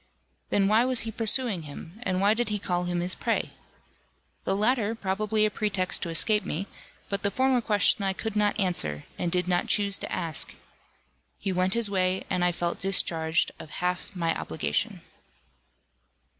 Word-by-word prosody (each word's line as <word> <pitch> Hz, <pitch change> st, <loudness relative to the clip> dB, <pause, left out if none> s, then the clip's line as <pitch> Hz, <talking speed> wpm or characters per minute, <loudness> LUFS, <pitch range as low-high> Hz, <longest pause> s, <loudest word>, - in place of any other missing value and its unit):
Then 195 Hz, -1 st, +3 dB
why 215 Hz, +3 st, +4 dB
was 255 Hz, -1 st, +2 dB
he 225 Hz, -, -4 dB
pursuing 225 Hz, -3 st, +2 dB
him, 160 Hz, +6 st, -10 dB
and 185 Hz, -5 st, -1 dB
why 200 Hz, +2 st, +4 dB
did 235 Hz, 0 st, -1 dB
he 210 Hz, -, 0 dB
call 180 Hz, -3 st, -1 dB
him 175 Hz, 0 st, -1 dB
his 180 Hz, +1 st, +1 dB
prey? -, -, -1 dB, 0.9 s
The 195 Hz, -, +1 dB
latter, 220 Hz, +1 st, +1 dB
probably 215 Hz, +1 st, 0 dB
a 215 Hz, -, 0 dB
pretext 195 Hz, -4 st, 0 dB
to 170 Hz, -, -3 dB
escape 210 Hz, +6 st, +2 dB
me, 175 Hz, +6 st, -3 dB, 0.4 s
but 200 Hz, 0 st, -2 dB
the 200 Hz, -, +1 dB
former 260 Hz, +3 st, +2 dB
question 205 Hz, -2 st, +3 dB
I 195 Hz, -1 st, +1 dB
could 220 Hz, +2 st, -5 dB
not 210 Hz, 0 st, +1 dB
answer, 75 Hz, -, -1 dB, 0.2 s
and 175 Hz, -, -1 dB
did 180 Hz, 0 st, +1 dB
not 175 Hz, -1 st, +1 dB
choose 200 Hz, -1 st, +3 dB
to -, -, -5 dB
ask. 160 Hz, -3 st, -2 dB, 0.8 s
He 195 Hz, -, -2 dB
went 185 Hz, +2 st, +1 dB
his 235 Hz, -2 st, +5 dB
way, 185 Hz, -1 st, 0 dB
and 180 Hz, -, +1 dB
I 180 Hz, -, +3 dB
felt 175 Hz, 0 st, -2 dB
discharged 165 Hz, -3 st, +1 dB
of 155 Hz, -, -9 dB
half 180 Hz, +4 st, -3 dB
my 165 Hz, -2 st, 0 dB
obligation. 75 Hz, -3 st, -2 dB
195 Hz, 175 wpm, -27 LUFS, 175-215 Hz, 0.9 s, his